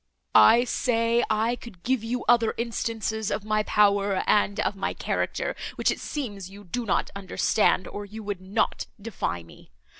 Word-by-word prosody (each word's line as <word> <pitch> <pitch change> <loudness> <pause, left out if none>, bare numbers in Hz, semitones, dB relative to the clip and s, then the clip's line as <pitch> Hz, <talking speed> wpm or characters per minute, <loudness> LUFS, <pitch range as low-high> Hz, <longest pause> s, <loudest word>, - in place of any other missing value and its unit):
"I 235 +2 +7
say, 235 -2 +1
I 220 +2 +1
could 210 -8 -13
give 255 -3 0
you 240 +2 -3
other 235 -2 +4
instances 225 -2 -2
of 210 - -2
my 215 0 +1
power 200 -2 +2
and 205 0 +2
of - - -1
my 195 - -3
character, - - -2 0.2
which - - +2
it - - -4
seems 205 -10 -5
you 200 +1 -12
do 230 +5 -4
not - - 0
understand, 195 0 +1
or 205 - -6
you 215 +2 -9
would 200 -3 -4
not 195 +4 -1
defy 195 - -3
me. 80 - -17
215 Hz, 170 wpm, -26 LUFS, 200-230 Hz, 0.2 s, I